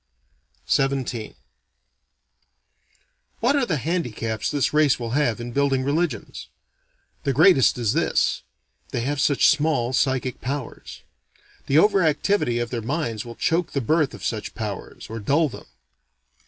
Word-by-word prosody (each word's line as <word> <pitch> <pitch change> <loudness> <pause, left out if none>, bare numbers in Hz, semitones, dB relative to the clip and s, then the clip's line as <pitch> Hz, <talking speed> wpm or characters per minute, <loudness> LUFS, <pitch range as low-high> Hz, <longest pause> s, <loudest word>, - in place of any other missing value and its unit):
XVII 135 -5 -1 2.0
What 250 +5 +2
are 270 -4 +1
the 160 - 0
handicaps 120 - -2
this 145 -1 0
race 150 -4 +3
will 115 -1 -4
have 125 -4 +1
in 120 +1 -6
building 135 0 +1
religions? 145 -4 -2 0.8
The 140 - 0
greatest 155 -2 +5
is 115 -2 0
this: 165 +3 +1 0.5
they - - -2
have 140 +3 -1
such 145 -2 +4
small 150 -5 +2
psychic 130 -1 0
powers. 135 -1 -6 0.6
The 140 - +3
over 200 +3 +5
activity 155 -4 +1
of 120 -1 -3
their 120 -2 -2
minds 115 -3 -3
will 120 -1 -9
choke 165 +6 0
the 140 - 0
birth 150 +3 +1
of - - -9
such 110 -2 -3
powers, 105 -4 -6
or 115 +1 -6
dull 145 +9 +2
them. - - -11
135 Hz, 140 wpm, -23 LUFS, 120-155 Hz, 2.0 s, greatest